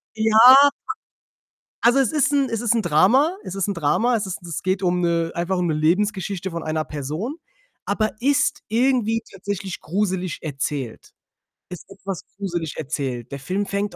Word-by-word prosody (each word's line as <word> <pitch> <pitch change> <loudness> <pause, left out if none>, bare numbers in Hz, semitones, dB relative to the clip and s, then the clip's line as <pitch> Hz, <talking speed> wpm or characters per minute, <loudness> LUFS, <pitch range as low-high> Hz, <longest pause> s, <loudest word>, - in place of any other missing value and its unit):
Ja, 220 0 +2 1.4
also, 240 +4 +4
es 265 -5 +2
ist 295 -1 +1
'n 275 -2 +2
es 225 - -2
ist 235 -1 +2
'n 230 - +2
Drama. 220 - +3
Es 185 - -7
ist 195 0 -1
'n - - 0
Drama. 175 +9 +1
Es 215 -2 -1
ist 190 -1 -5
'n 175 - -11
es 165 - -4
geht 185 +1 0
um 180 0 +1
'ne 170 -1 0
einfach 175 +2 -1
um 180 -1 0
'ne 160 - 0
Lebensgeschichte 190 +3 0
von 170 0 -4
einer 155 0 -1
Person, 155 - -5 0.5
aber 215 -1 0
ist 285 +3 +1
irgendwie 230 -1 +1
tatsächlich 195 -1 -5
gruselig 185 -1 -2
erzählt, 135 -4 -5 0.6
ist 180 -2 -10
etwas 195 -2 -7
gruselig 175 -6 -4
erzählt. 130 -5 -4
Der 140 - -5
Film 185 +9 -2
fängt 200 -1 -3
190 Hz, 170 wpm, -22 LUFS, 165-220 Hz, 1.4 s, also